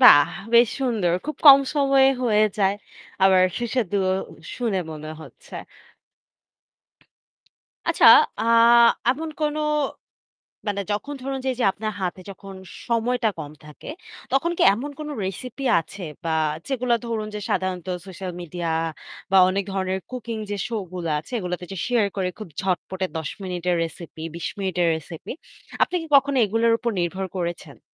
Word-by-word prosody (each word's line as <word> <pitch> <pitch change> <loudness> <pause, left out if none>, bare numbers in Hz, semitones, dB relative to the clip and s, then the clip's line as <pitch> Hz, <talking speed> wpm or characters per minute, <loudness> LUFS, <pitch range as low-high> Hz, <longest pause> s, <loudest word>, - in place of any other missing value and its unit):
বাহ! 145 - +8 0.2
বেশ 235 0 +7
সুন্দর। 220 -10 +1
খুব 305 - -4
কম 275 -1 +11
সময়ে 275 -2 +4 0.2
হয়ে 215 -2 +4
যায়। 195 0 +3 0.5
আবার 190 -1 +6 0.2
সুস্বাদুও 210 -6 0 0.2
উ - - -13 0.2
শুনে 220 -7 -1
মনে 155 0 -8
হচ্ছে। - - -14 2.3
আচ্ছা - - +4 0.3
আ - - 0 0.7
এমন 315 +5 -3
কোন 300 0 0 1.1
মানে 200 -1 -1
যখন 280 +8 -3
ধরুন 270 0 -3
যে, - - 0
এইযে 250 -1 -2
আপনার 215 +2 -4
হাতে 185 0 -3
যখন 195 0 -10 0.3
সময়টা 235 0 +1
কম 150 -2 -7
থাকে, 150 -1 -12 0.4
তখন 300 +6 +2
কি - - +2
এমন 275 +7 -5
কোন 305 -1 -6 0.2
রেসিপি 250 +8 -6 0.2
আছে 190 +4 -11 0.2
বা 165 - -1 0.4
যেগুলা 250 -3 +1
ধরুন 225 -2 -2
যে 210 - -4
সাধারণত 185 -1 -1 0.2
সোশ্যাল 185 -1 -6
মিডিয়া 175 0 -4 0.6
বা 195 - +6
অনেক 195 +1 -1
ধরনের 190 -1 -1
কুকিং 235 -3 -5
যে 205 - -2
show 225 -2 -3
গুলা 170 -3 -2
আছে 155 - -18
এগুলাতে 180 -2 -4
যে - - -6
শেয়ার 235 -4 +2
করে 190 -2 0
খুব 215 - -8
ঝটপটে 190 0 -2
১০ 160 -2 -3
মিনিটের 180 -1 -1
রেসিপি, 165 -1 -9
২০ 170 - -4
মিনিটের 180 -3 0
রেসিপি 160 +1 -8 0.5
আপনি 360 - +2
কি - - -7
কখনো 280 0 +2
এগুলোর 225 +3 +2
উপর 235 - -1
নির্ভর 185 +3 -2
করেছেন? 170 -4 -5
200 Hz, 150 wpm, -23 LUFS, 180-245 Hz, 2.3 s, কম